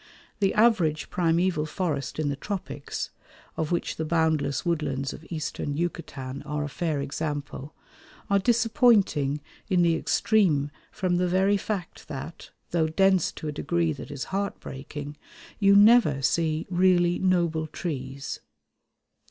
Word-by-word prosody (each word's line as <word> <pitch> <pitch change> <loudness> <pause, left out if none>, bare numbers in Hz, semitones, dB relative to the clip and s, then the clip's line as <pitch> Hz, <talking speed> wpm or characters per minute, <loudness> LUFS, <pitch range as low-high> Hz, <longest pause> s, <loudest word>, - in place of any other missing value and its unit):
The 195 -2 +2
average 190 -9 +3
primeval 170 -2 +1
forest 150 -7 -3
in 155 -2 0
the 140 - -1
tropics, 145 - -5 0.4
of 160 0 -2
which 175 - -1
the 160 - -1
boundless 160 -4 +1
woodlands 145 -5 -1
of 150 - -11
Eastern 150 -3 -3
Yucatan 145 -6 -4
are 150 +1 -3
a 145 - -4
fair 155 0 -2
example, 145 0 -4 0.5
are 200 0 +3
disappointing 220 - +3 0.3
in 180 -3 +3
the 170 -1 +4
extreme 165 -9 +2 0.2
from 185 -4 0
the 180 0 +1
very 190 +3 +3
fact 195 -3 -4
that, 150 +3 -7 0.2
though 165 -2 +2
dense 190 +2 +3
to 155 - -7
a - - -1
degree 165 +2 0
that 145 - -9
is 140 -2 -5
heartbreaking, 145 -6 -5 0.4
you 200 -1 +5
never 205 - +6
see 160 +3 +1
really 175 -1 +3
noble 170 -4 +1
trees. 140 -4 -5
160 Hz, 135 wpm, -26 LUFS, 145-185 Hz, 0.5 s, never